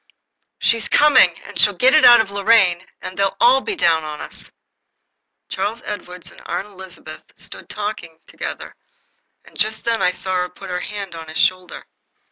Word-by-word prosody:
"She's 230 Hz, -1 st, 0 dB
coming, 260 Hz, -, +5 dB
and -, -, -9 dB
she'll 205 Hz, -2 st, +4 dB
get 255 Hz, +8 st, +4 dB
it 310 Hz, -, +5 dB
out 240 Hz, -1 st, +9 dB
of 220 Hz, -3 st, -1 dB
Lorraine, 200 Hz, -3 st, +2 dB, 0.2 s
and 185 Hz, -, -7 dB
they'll 195 Hz, 0 st, -1 dB
all 255 Hz, +3 st, +5 dB
be 430 Hz, -, -3 dB
down 165 Hz, -, +2 dB
on 150 Hz, -1 st, -7 dB
us." -, -, -8 dB, 1.0 s
Charles 225 Hz, +4 st, -3 dB
Edward 180 Hz, -4 st, -7 dB
and -, -, -16 dB
Aunt -, -, -3 dB
Elizabeth 185 Hz, -6 st, -11 dB
stood -, -, -10 dB
talking 205 Hz, -6 st, -5 dB
together, -, -, -7 dB, 0.7 s
and -, -, -19 dB
just 220 Hz, +1 st, -1 dB
then 230 Hz, -1 st, 0 dB
I 180 Hz, -, +3 dB
saw 185 Hz, 0 st, -3 dB
her 180 Hz, 0 st, -1 dB
put 185 Hz, +1 st, -11 dB
her 180 Hz, -, -2 dB
hand 200 Hz, -1 st, -6 dB
on 165 Hz, -1 st, -9 dB
his 155 Hz, -, -7 dB
shoulder. 185 Hz, -1 st, 0 dB
195 Hz, 175 wpm, -19 LUFS, 180-220 Hz, 1.0 s, out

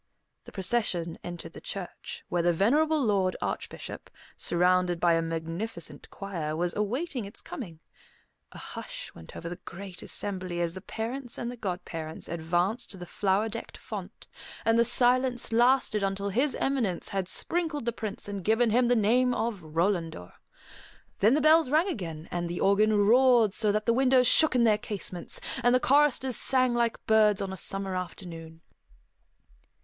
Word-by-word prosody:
The -, -, -11 dB
procession 185 Hz, -5 st, -1 dB
entered 175 Hz, -1 st, -7 dB
the -, -, -10 dB
church, 195 Hz, -3 st, -7 dB
where 175 Hz, -, 0 dB
the 175 Hz, 0 st, +3 dB
venerable 295 Hz, -, +2 dB
Lord 195 Hz, -3 st, +1 dB
Archbishop, -, -, -5 dB, 0.3 s
surrounded 180 Hz, 0 st, +2 dB
by 170 Hz, -1 st, +4 dB
a 165 Hz, -, +2 dB
magnificent 165 Hz, +4 st, -5 dB
choir, 170 Hz, -6 st, -4 dB
was 175 Hz, +2 st, -1 dB
awaiting 245 Hz, +4 st, -2 dB
its 200 Hz, -, -10 dB
coming. 170 Hz, -, -8 dB, 0.7 s
A -, -, -12 dB
hush -, -, -8 dB
went 80 Hz, -, -13 dB
over 170 Hz, -, -6 dB
the 175 Hz, +1 st, -5 dB
great 185 Hz, 0 st, -9 dB
assembly 185 Hz, -3 st, -3 dB
as 170 Hz, -1 st, 0 dB
the 190 Hz, -, -7 dB
parents 240 Hz, +5 st, -4 dB
and 240 Hz, 0 st, -3 dB
the -, -, -7 dB
godparents 175 Hz, -6 st, -5 dB
advanced 175 Hz, +8 st, -1 dB
to 195 Hz, -, -5 dB
the 175 Hz, -, -7 dB
flower 200 Hz, +3 st, 0 dB
decked 215 Hz, -, -7 dB
font, -, -, -8 dB, 0.4 s
and 225 Hz, +1 st, +4 dB
the 235 Hz, -, +5 dB
silence 245 Hz, 0 st, +2 dB
lasted 240 Hz, -2 st, +3 dB
until 195 Hz, +1 st, -1 dB
His 260 Hz, +8 st, +1 dB
Eminence 235 Hz, -11 st, -1 dB
had 195 Hz, -2 st, -2 dB
sprinkled 320 Hz, -, 0 dB
the 235 Hz, -, 0 dB
Prince 215 Hz, -1 st, -5 dB
and 200 Hz, -2 st, -5 dB
given 225 Hz, +3 st, +3 dB
him 245 Hz, +2 st, +3 dB
the 245 Hz, -, +3 dB
name 245 Hz, +3 st, +3 dB
of 220 Hz, -3 st, -2 dB
Rolandor. 165 Hz, -, -2 dB, 0.9 s
Then 220 Hz, +6 st, +5 dB
the 305 Hz, -, +2 dB
bells 310 Hz, -1 st, +5 dB
rang 315 Hz, +6 st, +3 dB
again, 170 Hz, -, -5 dB, 0.2 s
the 175 Hz, +1 st, -4 dB
organ 210 Hz, +2 st, +3 dB
roared 230 Hz, 0 st, +5 dB
so 215 Hz, -2 st, +1 dB
that 215 Hz, +1 st, -1 dB
the 230 Hz, -, +3 dB
windows 255 Hz, 0 st, +4 dB
shook 315 Hz, +2 st, +5 dB
in 245 Hz, -, +4 dB
their 215 Hz, -2 st, +4 dB
casements, 190 Hz, -4 st, -4 dB, 0.2 s
and 245 Hz, +1 st, +4 dB
the -, -, +4 dB
choristers 265 Hz, -3 st, +3 dB
sang 255 Hz, -2 st, +2 dB
like 235 Hz, -1 st, -1 dB
birds 215 Hz, -2 st, +4 dB
on 195 Hz, -1 st, -3 dB
a -, -, -4 dB
summer 195 Hz, +1 st, -3 dB
afternoon. 165 Hz, -3 st, -7 dB
205 Hz, 165 wpm, -28 LUFS, 175-245 Hz, 0.9 s, the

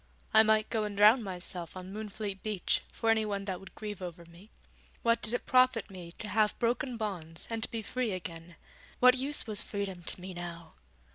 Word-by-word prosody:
I 220 Hz, -, +9 dB
might 215 Hz, 0 st, +3 dB
go 220 Hz, -1 st, +1 dB
and 205 Hz, -1 st, -4 dB
drown 215 Hz, +5 st, +7 dB
myself 180 Hz, -3 st, -3 dB
on 185 Hz, +1 st, -8 dB
Moonfleet 210 Hz, -2 st, -5 dB
beach, 210 Hz, -5 st, 0 dB
for 225 Hz, -1 st, +1 dB
anyone 210 Hz, -3 st, 0 dB
that 185 Hz, -3 st, -3 dB
would 195 Hz, -, -14 dB
grieve 210 Hz, -3 st, -6 dB
over 170 Hz, -1 st, -7 dB
me. 170 Hz, +5 st, -16 dB, 0.5 s
What 230 Hz, 0 st, +3 dB
did 215 Hz, -, -2 dB
it 245 Hz, -, -2 dB
profit 255 Hz, -4 st, +3 dB
me 175 Hz, -3 st, -9 dB
to 215 Hz, -, -2 dB
have 215 Hz, 0 st, +2 dB
broken 240 Hz, +2 st, 0 dB
bonds 175 Hz, -7 st, -3 dB
and 225 Hz, -1 st, -2 dB
to -, -, +1 dB
be 225 Hz, -1 st, -4 dB
free 250 Hz, +1 st, -2 dB
again? 170 Hz, -2 st, -7 dB, 0.4 s
what 250 Hz, +1 st, +7 dB
use 280 Hz, +3 st, +1 dB
was 215 Hz, -3 st, +3 dB
freedom 200 Hz, -3 st, -4 dB
to 175 Hz, -, 0 dB
me 185 Hz, +1 st, -7 dB
now? 175 Hz, -1 st, -7 dB
210 Hz, 200 wpm, -31 LUFS, 180-225 Hz, 0.5 s, I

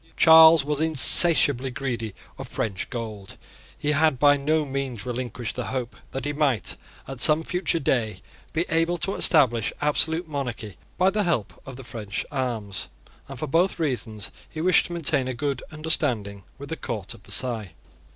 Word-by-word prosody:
Charles 160 Hz, -2 st, +8 dB
was 150 Hz, 0 st, -1 dB
insatiably 150 Hz, -3 st, +4 dB
greedy 120 Hz, -5 st, -4 dB, 0.2 s
of -, -, -6 dB
French 100 Hz, -4 st, -3 dB
gold: 110 Hz, -5 st, -7 dB, 0.4 s
he 150 Hz, -, -1 dB
had 155 Hz, -2 st, +2 dB
by 145 Hz, +2 st, +5 dB
no 150 Hz, +2 st, 0 dB
means 135 Hz, -5 st, -4 dB
relinquished 125 Hz, -2 st, -4 dB
the 125 Hz, -, -4 dB
hope 125 Hz, -2 st, -4 dB
that 135 Hz, -, -5 dB
he 145 Hz, -, -2 dB
might, 140 Hz, -, 0 dB, 0.3 s
at 135 Hz, -2 st, -7 dB
some 155 Hz, +1 st, +6 dB
future 180 Hz, 0 st, 0 dB
day, 110 Hz, -, -1 dB, 0.3 s
be 165 Hz, +2 st, -1 dB
able 165 Hz, +2 st, +1 dB
to 195 Hz, +4 st, -1 dB
establish 120 Hz, -, +2 dB
absolute 160 Hz, +3 st, 0 dB
monarchy 120 Hz, -, -5 dB, 0.2 s
by 185 Hz, +1 st, +3 dB
the 210 Hz, +2 st, 0 dB
help 170 Hz, -, -1 dB
of 135 Hz, -, -8 dB
the 135 Hz, -, -10 dB
French 105 Hz, -5 st, -5 dB
arms; 120 Hz, -8 st, -3 dB, 0.4 s
and -, -, -9 dB
for -, -, -3 dB
both 170 Hz, +7 st, +1 dB
reasons 120 Hz, -, -2 dB, 0.2 s
he 155 Hz, -, -8 dB
wished 180 Hz, +3 st, +3 dB
to 175 Hz, -, -7 dB
maintain 140 Hz, -6 st, +1 dB
a 130 Hz, -, -3 dB
good 140 Hz, 0 st, -2 dB
understanding 130 Hz, -10 st, -1 dB, 0.2 s
with 140 Hz, 0 st, -10 dB
the 160 Hz, -, -4 dB
court 105 Hz, -8 st, -5 dB
of -, -, -16 dB
Versailles. 110 Hz, -6 st, 0 dB
135 Hz, 170 wpm, -24 LUFS, 115-160 Hz, 0.4 s, Charles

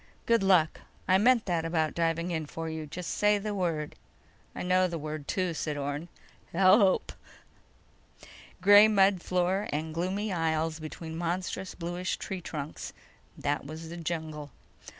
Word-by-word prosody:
"Good 230 Hz, -2 st, +3 dB
luck. 180 Hz, -5 st, +3 dB, 0.3 s
I 185 Hz, +1 st, +5 dB
meant 240 Hz, +2 st, +4 dB
that 170 Hz, -3 st, 0 dB
about 160 Hz, -2 st, 0 dB
diving 165 Hz, +1 st, 0 dB
in 160 Hz, -3 st, -2 dB
for 165 Hz, +2 st, -5 dB
you. 160 Hz, -1 st, -5 dB
Just 170 Hz, +3 st, -5 dB
say 210 Hz, 0 st, +3 dB
the 210 Hz, +1 st, -3 dB
word." 165 Hz, -6 st, -2 dB, 0.6 s
"I -, -, -4 dB
know 185 Hz, +1 st, +3 dB
the 170 Hz, -2 st, -4 dB
word, 155 Hz, -1 st, -6 dB
too," 185 Hz, -3 st, -1 dB
said 150 Hz, -1 st, -3 dB
Orne. 145 Hz, +4 st, -4 dB, 0.4 s
"HELP!" 190 Hz, +2 st, +4 dB, 1.5 s
Gray 205 Hz, +2 st, +8 dB
mud 195 Hz, -3 st, +4 dB
floor 185 Hz, +3 st, 0 dB
and 155 Hz, +2 st, -3 dB
gloomy 190 Hz, +5 st, -2 dB
aisles 160 Hz, -1 st, 0 dB
between 160 Hz, +1 st, -7 dB
monstrous 180 Hz, +2 st, -3 dB
bluish 175 Hz, +2 st, -3 dB
tree 190 Hz, -2 st, -5 dB
trunks—that 145 Hz, -2 st, -6 dB
was 160 Hz, +2 st, -8 dB
the 170 Hz, -, -7 dB
jungle. 155 Hz, -3 st, -4 dB
170 Hz, 145 wpm, -29 LUFS, 160-185 Hz, 1.5 s, Gray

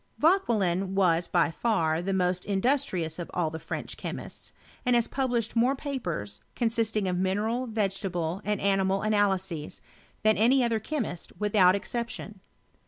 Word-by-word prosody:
Vauquelin 200 Hz, -, +2 dB
was 175 Hz, -3 st, +3 dB
by 170 Hz, -2 st, +2 dB
far 165 Hz, -6 st, +1 dB
the 195 Hz, +2 st, -2 dB
most 180 Hz, -1 st, +1 dB
industrious 190 Hz, -, 0 dB
of 175 Hz, -, -5 dB
all 165 Hz, -3 st, 0 dB
the 160 Hz, -, -5 dB
French 165 Hz, -, -5 dB
chemists, -, -, -7 dB, 0.3 s
and 250 Hz, 0 st, +3 dB
has 235 Hz, -1 st, +3 dB
published 245 Hz, -4 st, -1 dB
more 245 Hz, +4 st, +3 dB
papers, 175 Hz, -, -4 dB
consisting 225 Hz, -4 st, 0 dB
of 180 Hz, -1 st, 0 dB
mineral, 215 Hz, +7 st, 0 dB
vegetable, 195 Hz, -5 st, -1 dB
and 210 Hz, -1 st, -1 dB
animal 195 Hz, 0 st, +1 dB
analyses, 195 Hz, -7 st, 0 dB, 0.4 s
than 215 Hz, 0 st, +4 dB
any 250 Hz, +4 st, +4 dB
other 230 Hz, -2 st, +1 dB
chemist 220 Hz, -, -4 dB
without 200 Hz, -3 st, +4 dB
exception. 215 Hz, -1 st, -4 dB
200 Hz, 140 wpm, -28 LUFS, 180-230 Hz, 0.4 s, than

